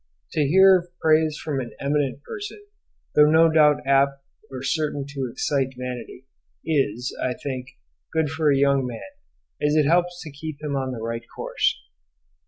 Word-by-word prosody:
To 155 Hz, -, 0 dB
hear 190 Hz, +5 st, +6 dB
of 175 Hz, -, -11 dB
praise 155 Hz, -1 st, +3 dB
from 150 Hz, -4 st, -3 dB
an 120 Hz, -2 st, -6 dB
eminent 140 Hz, -1 st, -1 dB
person, 410 Hz, -, -7 dB, 0.5 s
though 150 Hz, 0 st, +6 dB
no 160 Hz, +1 st, +5 dB
doubt 150 Hz, -3 st, +4 dB
apt 140 Hz, 0 st, +2 dB, 0.3 s
or 130 Hz, 0 st, -7 dB
certain 145 Hz, -1 st, -1 dB
to 135 Hz, -3 st, -4 dB
excite 135 Hz, +1 st, -1 dB
vanity, 125 Hz, 0 st, -7 dB, 0.4 s
is, 130 Hz, -6 st, -1 dB
I 125 Hz, -1 st, -1 dB
think, 130 Hz, -2 st, -5 dB, 0.4 s
good 160 Hz, -1 st, +1 dB
for 160 Hz, -2 st, +2 dB
a 140 Hz, -, +3 dB
young 140 Hz, -1 st, +2 dB
man, 125 Hz, -, -8 dB, 0.5 s
as 150 Hz, +1 st, +2 dB
it 155 Hz, -2 st, +4 dB
helps 175 Hz, +3 st, +2 dB
to 155 Hz, -, -8 dB
keep 145 Hz, +1 st, -7 dB
him 150 Hz, -2 st, -3 dB
in 135 Hz, -1 st, -1 dB
the 115 Hz, -3 st, -6 dB
right 115 Hz, 0 st, -3 dB
course. -, -, 0 dB
145 Hz, 170 wpm, -24 LUFS, 135-155 Hz, 0.5 s, hear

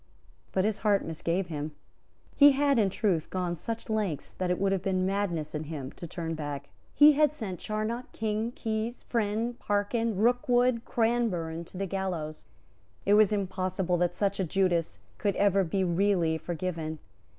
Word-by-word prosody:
But 190 Hz, 0 st, +1 dB
his 215 Hz, -1 st, 0 dB
heart 205 Hz, -2 st, +2 dB
misgave 170 Hz, +3 st, -1 dB
him. 150 Hz, -1 st, -4 dB, 0.6 s
He 285 Hz, 0 st, +8 dB
had, 280 Hz, -2 st, +3 dB
in 205 Hz, -3 st, +3 dB
truth, 185 Hz, -5 st, 0 dB
gone 180 Hz, -2 st, -2 dB
such 230 Hz, +7 st, -5 dB
lengths 210 Hz, -9 st, -2 dB
that 185 Hz, -1 st, -2 dB
it 180 Hz, -, +1 dB
would 195 Hz, 0 st, +2 dB
have 195 Hz, -2 st, 0 dB
been 185 Hz, -1 st, 0 dB
madness 185 Hz, -6 st, -1 dB
in 155 Hz, 0 st, -3 dB
him 145 Hz, -4 st, -6 dB
to 170 Hz, -, -9 dB
turn 165 Hz, 0 st, -4 dB
back. 145 Hz, -3 st, -5 dB, 0.3 s
He 295 Hz, +1 st, +9 dB
had 300 Hz, 0 st, +3 dB
sent 195 Hz, -, -5 dB
Charnock, 215 Hz, +3 st, -3 dB
King, 220 Hz, +1 st, -2 dB
Keyes, 225 Hz, +1 st, -3 dB
Friend, 230 Hz, +1 st, -1 dB
Parkyns, 210 Hz, +2 st, 0 dB
Rookwood, 245 Hz, +1 st, +2 dB
Cranburne, 205 Hz, -9 st, 0 dB
to 180 Hz, -, -12 dB
the 195 Hz, -, -1 dB
gallows. 180 Hz, -5 st, -4 dB, 0.6 s
It 200 Hz, -, +4 dB
was 210 Hz, -1 st, +6 dB
impossible 185 Hz, -2 st, -1 dB
that 175 Hz, 0 st, 0 dB
such 200 Hz, 0 st, 0 dB
a -, -, +2 dB
Judas 175 Hz, -1 st, +1 dB, 0.2 s
could 200 Hz, -3 st, 0 dB
ever 200 Hz, -1 st, +3 dB
be 190 Hz, +3 st, 0 dB
really 175 Hz, -2 st, +2 dB
forgiven. 165 Hz, -2 st, -4 dB
195 Hz, 165 wpm, -29 LUFS, 170-220 Hz, 0.6 s, He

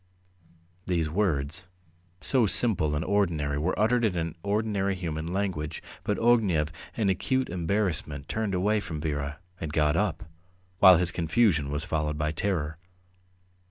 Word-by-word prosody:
These 85 Hz, -4 st, 0 dB
words, 85 Hz, -1 st, -1 dB, 0.5 s
so 125 Hz, -5 st, +3 dB
simple 90 Hz, -9 st, +4 dB
and 75 Hz, +3 st, -2 dB
ordinary, 80 Hz, -8 st, 0 dB
were 85 Hz, +5 st, -1 dB
uttered 120 Hz, +4 st, +2 dB
in 85 Hz, -7 st, 0 dB
ordinary 100 Hz, -1 st, 0 dB
human 80 Hz, -3 st, -4 dB
language, 85 Hz, -4 st, -3 dB, 0.2 s
but 105 Hz, -, -1 dB
Ognev, 100 Hz, -10 st, +3 dB, 0.3 s
in 110 Hz, -3 st, +1 dB
acute 130 Hz, +7 st, 0 dB
embarrassment, 85 Hz, -5 st, -2 dB
turned 110 Hz, -3 st, -2 dB
away 105 Hz, +4 st, +2 dB
from 80 Hz, -6 st, -5 dB
Vera, 75 Hz, -1 st, -3 dB, 0.2 s
and 80 Hz, -3 st, -4 dB
got 75 Hz, -1 st, +2 dB
up, -, -, 0 dB, 0.6 s
while 90 Hz, -2 st, +9 dB
his 85 Hz, 0 st, +1 dB
confusion 80 Hz, -3 st, +2 dB
was 75 Hz, +1 st, -3 dB
followed 75 Hz, +1 st, -2 dB
by 75 Hz, 0 st, -1 dB
terror. 80 Hz, -3 st, -2 dB
85 Hz, 135 wpm, -27 LUFS, 75-100 Hz, 0.6 s, while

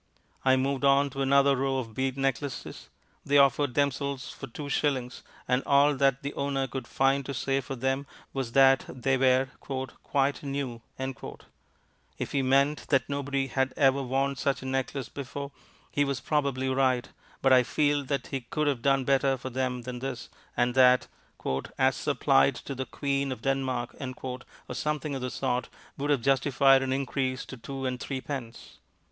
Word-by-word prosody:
I 130 Hz, 0 st, +5 dB
moved 135 Hz, +1 st, 0 dB
on 140 Hz, 0 st, +4 dB
to 135 Hz, 0 st, -4 dB
another 140 Hz, +1 st, +4 dB
row 135 Hz, 0 st, 0 dB
of 115 Hz, -4 st, -4 dB
bead 130 Hz, +2 st, -1 dB
necklaces. 135 Hz, -, -3 dB, 0.3 s
They 145 Hz, +1 st, +3 dB
offered 140 Hz, -1 st, +4 dB
themselves 140 Hz, -1 st, -1 dB
for 135 Hz, -, -8 dB
two 145 Hz, +4 st, -7 dB
shillings, 130 Hz, -3 st, -1 dB, 0.3 s
and 125 Hz, +1 st, +2 dB
all 140 Hz, +1 st, +5 dB
that 135 Hz, 0 st, +2 dB
the 140 Hz, -, -3 dB
owner 140 Hz, -1 st, -1 dB
could 130 Hz, -2 st, -6 dB
find 135 Hz, +1 st, +2 dB
to 140 Hz, -, -4 dB
say 135 Hz, +2 st, 0 dB
for 135 Hz, +1 st, -6 dB
them 135 Hz, +2 st, -1 dB, 0.3 s
was 130 Hz, -4 st, -3 dB
that 135 Hz, -1 st, +6 dB
they 135 Hz, +1 st, 0 dB
were 130 Hz, 0 st, +3 dB
"Quite 135 Hz, +1 st, -2 dB
New." 135 Hz, -4 st, -4 dB, 1.4 s
If -, -, -4 dB
he 140 Hz, -, +1 dB
meant 140 Hz, +3 st, +2 dB
that 135 Hz, -3 st, +2 dB
nobody 140 Hz, -1 st, -1 dB
had 130 Hz, 0 st, -1 dB
ever 135 Hz, -1 st, +4 dB
worn 135 Hz, +2 st, 0 dB
such 135 Hz, +1 st, -1 dB
a -, -, -7 dB
necklace 135 Hz, 0 st, -2 dB
before, 140 Hz, +1 st, -6 dB, 0.4 s
he 145 Hz, -, +2 dB
was 140 Hz, -2 st, -1 dB
probably 140 Hz, -3 st, 0 dB
right, 130 Hz, -2 st, +2 dB, 0.4 s
but 135 Hz, -1 st, +6 dB
I 130 Hz, -, +7 dB
feel 145 Hz, +3 st, +1 dB
that 135 Hz, -1 st, -2 dB
he 135 Hz, -2 st, -3 dB
could 150 Hz, +6 st, -2 dB
have 140 Hz, -5 st, 0 dB
done 135 Hz, 0 st, +3 dB
better 135 Hz, 0 st, +2 dB
for 130 Hz, +1 st, -6 dB
them 125 Hz, -1 st, -2 dB
than 125 Hz, 0 st, -5 dB
this, 130 Hz, -2 st, -5 dB, 0.3 s
and 120 Hz, 0 st, +2 dB
that, 125 Hz, -1 st, +5 dB, 0.7 s
"As -, -, +3 dB
supplied 70 Hz, 0 st, +3 dB
to 140 Hz, -, -6 dB
the 130 Hz, 0 st, -4 dB
Queen 140 Hz, -1 st, -1 dB
of 120 Hz, -3 st, -6 dB
Denmark," 130 Hz, -3 st, -1 dB, 0.3 s
or 130 Hz, -1 st, -4 dB, 0.3 s
something 150 Hz, -1 st, -2 dB
of 135 Hz, -, -3 dB
the 125 Hz, -, -2 dB
sort, 125 Hz, -1 st, -2 dB, 0.3 s
would 145 Hz, +1 st, -1 dB
have 140 Hz, -4 st, +2 dB
justified 135 Hz, 0 st, +4 dB
an 135 Hz, 0 st, -1 dB
increase 130 Hz, -1 st, -1 dB
to -, -, -8 dB
two 135 Hz, +2 st, -6 dB
and 125 Hz, -1 st, -2 dB
threepence. 130 Hz, -3 st, -6 dB
135 Hz, 175 wpm, -28 LUFS, 130-140 Hz, 1.4 s, I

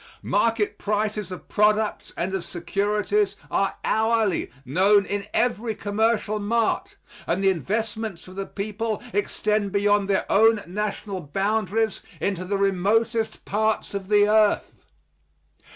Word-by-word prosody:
Market 225 Hz, -2 st, +1 dB
prices 210 Hz, -2 st, -1 dB
of 185 Hz, -, -8 dB
products 215 Hz, 0 st, +1 dB
and 185 Hz, +3 st, -2 dB
of 190 Hz, -3 st, -2 dB
securities 205 Hz, -, 0 dB, 0.2 s
are -, -, +1 dB
hourly 220 Hz, -3 st, +1 dB, 0.2 s
known 195 Hz, +9 st, +4 dB
in 200 Hz, 0 st, -3 dB
every 230 Hz, -2 st, 0 dB
commercial 215 Hz, +1 st, 0 dB
mart, 225 Hz, +2 st, 0 dB, 0.3 s
and 180 Hz, +4 st, 0 dB
the 195 Hz, -, +5 dB
investments 215 Hz, +1 st, -3 dB
of 185 Hz, -, -11 dB
the 195 Hz, 0 st, -4 dB
people 215 Hz, +2 st, -3 dB
extend 205 Hz, 0 st, 0 dB
beyond 205 Hz, 0 st, +2 dB
their 195 Hz, -, +1 dB
own 220 Hz, 0 st, +4 dB
national 200 Hz, +1 st, -4 dB
boundaries 210 Hz, +6 st, 0 dB, 0.2 s
into 190 Hz, -2 st, -1 dB
the 200 Hz, +2 st, -1 dB
remotest 215 Hz, +4 st, +1 dB
parts 215 Hz, +1 st, 0 dB
of 195 Hz, -1 st, -4 dB
the 205 Hz, 0 st, +4 dB
earth. 215 Hz, -1 st, +3 dB
205 Hz, 125 wpm, -24 LUFS, 195-220 Hz, 0.3 s, the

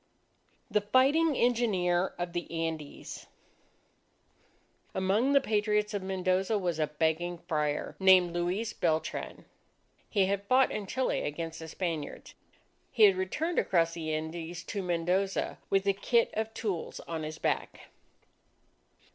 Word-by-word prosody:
_ -, -, -26 dB
THE 210 Hz, -, +3 dB
FIGHTING 275 Hz, +8 st, +3 dB
ENGINEER 195 Hz, -8 st, +1 dB
OF 175 Hz, 0 st, -4 dB
THE 175 Hz, -1 st, -3 dB
ANDES 165 Hz, -3 st, -5 dB, 1.7 s
Among 205 Hz, +9 st, +2 dB
the 280 Hz, -, +7 dB
Patriots 210 Hz, -3 st, 0 dB
of 205 Hz, -, -2 dB
Mendoza 190 Hz, +2 st, 0 dB
was 175 Hz, -5 st, -1 dB
a 155 Hz, -, +2 dB
begging 160 Hz, +3 st, -1 dB
Friar, 150 Hz, -3 st, -2 dB
named 185 Hz, -2 st, +6 dB
Luis 180 Hz, +6 st, -1 dB
Beltran. 160 Hz, -2 st, -2 dB, 0.6 s
He 200 Hz, -3 st, +3 dB
had 200 Hz, +1 st, -2 dB
fought 255 Hz, +2 st, +4 dB
in 205 Hz, -2 st, -4 dB
Chile 260 Hz, +6 st, 0 dB
against 165 Hz, +2 st, -4 dB
the 160 Hz, -, -7 dB
Spaniards. 165 Hz, -3 st, -4 dB, 0.6 s
He 225 Hz, -, +3 dB
had 200 Hz, -2 st, +8 dB
returned 300 Hz, -, -1 dB
across 170 Hz, -2 st, +2 dB
the 160 Hz, -2 st, -4 dB
Andes 165 Hz, +2 st, -4 dB
to 200 Hz, +1 st, -4 dB
Mendoza 180 Hz, +2 st, 0 dB
with 195 Hz, 0 st, +2 dB
a 200 Hz, -, +3 dB
kit 230 Hz, +4 st, +2 dB
of 220 Hz, 0 st, -2 dB
tools 195 Hz, -7 st, -3 dB
on 165 Hz, -1 st, -5 dB
his 155 Hz, +1 st, -5 dB
back. -, -, -2 dB
185 Hz, 135 wpm, -30 LUFS, 165-210 Hz, 1.7 s, had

